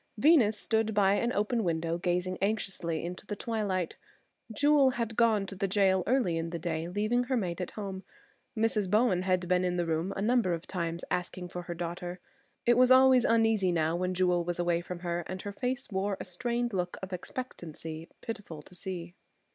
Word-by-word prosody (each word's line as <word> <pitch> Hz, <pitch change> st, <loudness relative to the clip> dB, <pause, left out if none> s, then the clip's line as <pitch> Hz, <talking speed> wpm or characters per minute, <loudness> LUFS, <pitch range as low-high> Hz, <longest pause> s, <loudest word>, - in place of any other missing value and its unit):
Venus 235 Hz, -5 st, +5 dB
stood 220 Hz, 0 st, 0 dB
by 195 Hz, -1 st, +4 dB
an 235 Hz, +4 st, +1 dB
open 220 Hz, +1 st, 0 dB
window 165 Hz, -1 st, -1 dB
gazing 180 Hz, +1 st, -1 dB
anxiously 195 Hz, -6 st, -1 dB
into 180 Hz, +1 st, -6 dB
the 210 Hz, -, -3 dB
twilight. 200 Hz, -6 st, -2 dB, 0.5 s
Jewel 285 Hz, +3 st, +4 dB
had 230 Hz, -1 st, -2 dB
gone 220 Hz, -4 st, +3 dB
to 195 Hz, -, -7 dB
the 195 Hz, +1 st, -1 dB
jail 190 Hz, -1 st, +3 dB
early 215 Hz, -10 st, +2 dB
in 165 Hz, 0 st, -3 dB
the 170 Hz, -, -4 dB
day, 165 Hz, 0 st, -3 dB
leaving 215 Hz, +7 st, 0 dB
her 260 Hz, 0 st, 0 dB
maid 180 Hz, -4 st, -2 dB
at 180 Hz, -, -3 dB
home. 195 Hz, -2 st, -4 dB, 0.6 s
Mrs. 220 Hz, -3 st, +1 dB
Bowen 210 Hz, -3 st, +3 dB
had 185 Hz, -1 st, 0 dB
been 180 Hz, 0 st, +2 dB
in 180 Hz, -1 st, 0 dB
the 175 Hz, -, +1 dB
room 165 Hz, +3 st, -1 dB
a -, -, -4 dB
number 230 Hz, -5 st, +2 dB
of 165 Hz, 0 st, -4 dB
times 170 Hz, -2 st, -3 dB
asking 180 Hz, 0 st, -3 dB
for 180 Hz, -, -5 dB
her 175 Hz, 0 st, -6 dB
daughter. 175 Hz, +1 st, -5 dB, 0.5 s
She 240 Hz, -, +6 dB
was 250 Hz, +1 st, +5 dB
always 260 Hz, -1 st, +7 dB
uneasy 225 Hz, -5 st, +3 dB
now 165 Hz, -1 st, +1 dB
when 180 Hz, +1 st, -1 dB
Jewel 180 Hz, -1 st, +2 dB
was 175 Hz, 0 st, -2 dB
away 175 Hz, -1 st, +1 dB
from 175 Hz, 0 st, -7 dB
her, 175 Hz, -1 st, -1 dB
and 185 Hz, +1 st, -6 dB
her 205 Hz, -, -4 dB
face 255 Hz, +5 st, -2 dB
wore 195 Hz, 0 st, -1 dB
a -, -, -5 dB
strained 235 Hz, +5 st, -2 dB
look 180 Hz, -1 st, -2 dB
of 190 Hz, 0 st, -5 dB
expectancy 165 Hz, -6 st, -6 dB
pitiful 200 Hz, -9 st, -7 dB
to 180 Hz, -, -17 dB
see. 180 Hz, -1 st, -6 dB
190 Hz, 195 wpm, -30 LUFS, 175-220 Hz, 0.6 s, always